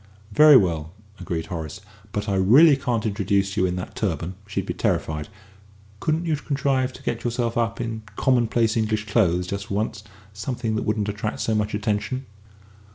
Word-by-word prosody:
"Very 150 +5 +8
well," 85 -5 0 0.3
agreed 85 -2 -3
Horace; 80 0 -6 0.3
"but 105 +1 -3
I 100 - 0
really 130 - +6
can't 120 -5 -1
introduce 100 -1 0
you 95 - +2
in 90 - -2
that 90 - -6
turban 85 -3 -2
she'd 100 - -3
be - - -3
terrified. 75 -1 -1 0.7
Couldn't 160 +5 0
you 160 -2 +1
contrive 135 -3 0
to - - -13
get 115 0 -3
yourself 120 -1 -1
up 115 -1 0
in 115 -2 -3
commonplace 120 -3 +2
English 110 -1 0
clothes, 90 -5 +2
just 100 +2 -4
for 100 - -3
once 105 0 -2 0.3
something 115 +1 -3
that 110 - -2
wouldn't 105 -1 0
attract 105 +1 -3
so 110 - 0
much 105 -1 0
attention?" 105 +5 -2
105 Hz, 170 wpm, -24 LUFS, 95-120 Hz, 0.7 s, Very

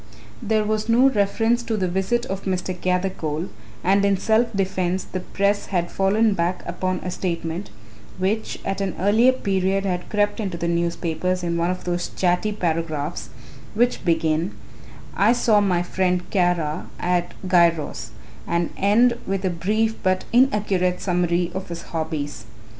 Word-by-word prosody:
There 220 -1 +1
was 215 +1 -1
no 250 +4 +6
reference 225 +2 +1
to 225 -2 -2
the 185 -2 0
visit 190 +7 0
of 195 -4 -5
Mr. 185 -1 -1
Gathercole 180 -3 -2 0.3
and 195 +2 +3
in 200 -1 +3
self 220 +4 +2
defence 190 -2 -1
the 185 - -5
press 200 +2 0
had 175 -3 -1
fallen 210 +3 +2
back 175 0 -1
upon 185 +1 -2
a 180 - -4
statement, 170 +1 -3 0.5
which 200 +4 -1
at 195 0 -2
an 195 -3 -2
earlier 215 +7 +5
period 195 -5 0
had 180 -2 -2
crept 205 +1 +1
into 190 -5 -3
the 170 - -2
newspapers 170 +1 -1
in 170 -1 -1
one 170 +1 +1
of 180 0 -3
those 175 0 -2
chatty 180 +3 +1
paragraphs 165 -4 -2 0.5
which 245 +3 +1
begin 165 +1 +1 0.6
"I 210 +4 +4
saw 225 -4 +3
my 180 -3 +1
friend 180 0 0
Kara 175 -5 0
at 175 0 0
Giros" 165 -10 +2 0.4
and 170 0 0
end 235 +5 +3
with 195 0 -1
a 185 - +1
brief 215 +6 0
but 185 0 +1
inaccurate 205 -7 +2
summary 175 -1 0
of 190 0 -5
his 170 0 -6
hobbies. 155 -8 -3
185 Hz, 155 wpm, -23 LUFS, 175-205 Hz, 0.6 s, no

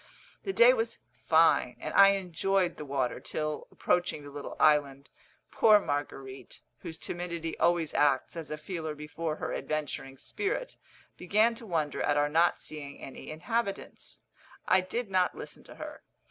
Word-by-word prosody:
The 390 - -3
day 485 +5 +7
was 460 -2 -1 0.3
fine, - - +4
and - - -5
I 195 0 +8
enjoyed 190 0 0
the 150 - -6
water 135 -3 -1
till, 155 -1 -3
approaching 175 -4 0
the 145 - -10
little 145 0 -7
island, 140 -2 +3 0.4
poor 215 -2 +6
Marguerite, 135 -5 -5 0.2
whose 160 - -7
timidity 170 -1 -4
always 170 -3 +2
acts 145 0 +2
as 165 -2 -6
a 155 - -4
feeler 160 -1 -5
before 155 +1 -4
her - - -4
adventuring 145 -3 -4
spirit, 415 - -3 0.4
began 215 +6 +3
to 230 0 -9
wonder 155 -5 -1
at 145 - +2
our 145 0 +2
not 165 +3 +3
seeing 145 -2 -7
any 135 - -9
inhabitants. 200 +7 -3 0.5
I 185 0 +5
did 200 +3 -4
not 185 -1 +2
listen - - -9
to - - -12
her. - - -8
160 Hz, 155 wpm, -30 LUFS, 145-195 Hz, 0.5 s, I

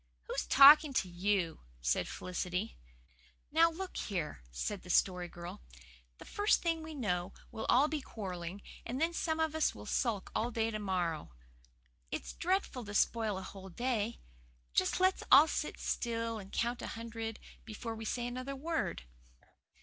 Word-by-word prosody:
"Who's - - -3
talking 290 +1 +9
to 195 - +1
you?" 180 -1 0 0.2
said - - +1
Felicity. 180 +3 -3 0.8
"Now, 330 +2 +6
look 365 +3 -6
here," 170 - -3
said 180 - -3
the 180 - -13
Story 180 0 +2
Girl, 175 - -9 0.6
"the - - -12
first 415 +1 +2
thing 330 -2 0
we 315 0 -7
know 180 -7 -1 0.2
we'll 220 - -5
all 270 +4 +6
be 305 -1 -2
quarrelling, 185 -5 -6 0.2
and 250 +3 -4
then 330 +2 +1
some 320 -1 -1
of 320 -1 +1
us 315 0 +1
will - - -9
sulk 225 -6 -1
all 230 +2 0
day 225 -1 0
to 215 - -3
morrow. 175 - -2 0.7
It's - - -5
dreadful 360 -8 -1
to 205 0 -7
spoil 220 -2 +2
a 190 - -5
whole 190 0 -9
day. 235 +2 -1 0.5
Just 185 - +2
let's 370 0 +3
all 285 +4 +10
sit - - -3
still 230 -1 -2
and 195 -1 -11
count 240 +1 -1
a - - -4
hundred 225 -1 -5 0.3
before 225 +1 -6
we 225 0 -7
say 240 +2 -2
another 255 +3 -4
word." 270 - -2
225 Hz, 165 wpm, -33 LUFS, 190-275 Hz, 0.8 s, all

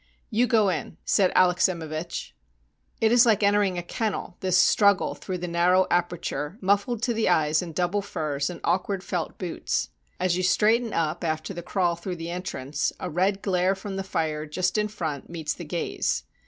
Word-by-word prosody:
"You 235 +3 +3
go 215 -3 +4
in," 165 -1 -3
said 190 -3 +3
Alexsimevich. 170 - +1 0.7
It 220 0 +3
is 240 0 +6
like 215 -2 +3
entering 200 -2 +3
a 175 - -3
kennel, 200 -1 -3
this 185 -2 +2
struggle 200 +1 +4
through 185 -2 -5
the 180 0 -4
narrow 180 +2 +3
aperture, 175 -1 -1
mufifled 205 +4 +1
to 240 - +1
the 225 -3 +1
eyes 155 -2 +3
in 175 -2 -6
double 180 +4 0
furs 150 -7 -2
and 175 - -7
awkward 185 +2 0
felt 175 -3 -3
boots. 180 -3 -2 0.3
As 185 -1 +1
you 185 - 0
straighten 220 +5 +3
up 160 -1 -1
after 155 +3 -2
the 175 - -6
crawl 175 0 0
through 175 +2 -5
the 165 0 -6
entrance, 145 -6 -3
a 180 - -4
red 190 +4 +1
glare 185 0 +2
from 195 0 -6
the 195 - -2
fire 155 -4 -2
just 180 +5 -1
in 210 -1 +2
front 160 -9 -5
meets 160 -3 -3
the 170 - -8
gaze. 170 +3 -2
180 Hz, 180 wpm, -26 LUFS, 170-200 Hz, 0.7 s, is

